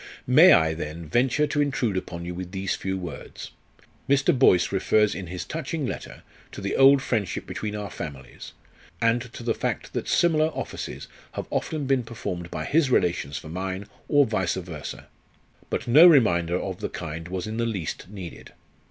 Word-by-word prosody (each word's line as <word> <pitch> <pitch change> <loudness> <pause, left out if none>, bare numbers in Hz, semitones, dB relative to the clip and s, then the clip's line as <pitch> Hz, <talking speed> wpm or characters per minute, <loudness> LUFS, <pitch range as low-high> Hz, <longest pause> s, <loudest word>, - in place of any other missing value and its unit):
"May - - +7
I, 80 0 +5
then, 80 +1 -6
venture 125 - +2
to 145 0 0
intrude 135 -7 0
upon 85 -2 -4
you 90 - -4
with 90 +1 -7
these 95 0 -1
few 95 0 -3
words? 85 -5 -8 0.6
Mr. 140 0 +4
Boyce 90 -9 +4
refers 105 +2 +2
in 95 -2 -6
his 90 +1 -5
touching 155 -1 -3
letter - - -6 0.3
to - - -7
the 100 0 -2
old 135 0 +6
friendship 105 -6 -2
between 105 -1 -4
our 105 -2 -5
families, 70 -6 -8 0.5
and 115 +1 +2
to - - -8
the 115 -1 +1
fact - - -3
that - - -3
similar 155 -2 +3
offices - - -6 0.3
have - - -4
often 155 -3 -2
been 135 -1 +2
performed 90 -7 -6
by - - -4
his 150 -2 +2
relations 85 - +1
for 80 - -9
mine, 95 +3 -4 0.2
or 145 -2 +5
vice 95 -6 0
versa. 85 -5 -7 0.6
But - - -3
no 150 +9 +9
reminder 90 - +4
of 95 -2 -5
the - - -3
kind 80 -1 -6
was 90 0 -4
in 110 +1 -5
the 115 0 0
least 95 -5 -4
needed. 95 -5 -9
100 Hz, 180 wpm, -25 LUFS, 90-130 Hz, 0.6 s, no